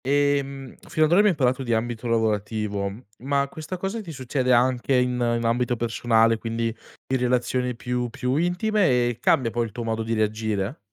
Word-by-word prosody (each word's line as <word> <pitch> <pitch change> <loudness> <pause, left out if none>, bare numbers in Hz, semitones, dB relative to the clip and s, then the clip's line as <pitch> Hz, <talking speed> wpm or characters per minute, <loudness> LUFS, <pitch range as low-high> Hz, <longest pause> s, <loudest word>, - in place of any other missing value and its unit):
Ehm, 140 -1 0 0.2
fino 155 - +3
ad 155 - -1
ora 175 - +6
abbiamo 205 -6 +4
parlato 130 -1 +1
di 120 -3 0
ambito 120 +1 -3
lavorativo, 105 -3 -1 0.3
ma 140 +2 0
questa 155 +5 -6
cosa 195 +5 -3
ti 180 -6 -8
succede 130 -2 -1
anche 125 +2 +3
in 125 0 +2
in 120 -1 0
ambito 120 +1 +1
personale, 115 -1 +2
quindi 115 0 -2 0.4
in - - +4
relazioni 125 0 0
più 125 0 -2
più 125 +2 -2
intime 180 +4 +1 0.2
e 120 - -4
cambia 120 -4 +2
poi 120 0 0
il 110 - -8
tuo 120 +3 -5
modo 115 0 -2
di 115 +1 -1
reagire? 110 +1 -1
125 Hz, 180 wpm, -24 LUFS, 115-140 Hz, 0.4 s, ora